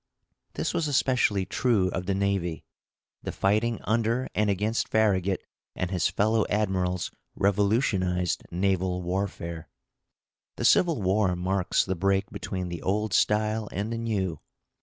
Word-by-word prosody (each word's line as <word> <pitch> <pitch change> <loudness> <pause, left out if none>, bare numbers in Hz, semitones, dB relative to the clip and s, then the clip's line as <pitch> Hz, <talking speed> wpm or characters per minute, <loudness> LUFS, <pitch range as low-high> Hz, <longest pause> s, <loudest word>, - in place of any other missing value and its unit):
This - - -1
was 165 - 0
especially 125 -8 +2
true 105 -1 +1
of 90 +1 -4
the 100 - +1
navy. 95 -4 -1 0.6
The - - -4
fighting 110 +4 +1
under 115 +3 +1
and 105 0 +1
against 105 +4 0
Farragut 100 -4 +2 0.3
and 90 0 -2
his 90 -4 +2
fellow 110 +1 +2
admirals 95 -4 0 0.2
revolutionized 100 -3 +1
naval 90 0 0
warfare. 90 -3 -3 0.9
The - - -3
Civil 165 - +4
War 95 0 +2
marks 90 +1 +1
the 95 - -1
break 95 +3 0
between 90 -2 -4
the 85 -2 -5
old 105 +1 -1
style 110 0 +1
and 105 +4 -3
the - - -2
new. 95 -8 -2
100 Hz, 135 wpm, -27 LUFS, 90-110 Hz, 0.9 s, Civil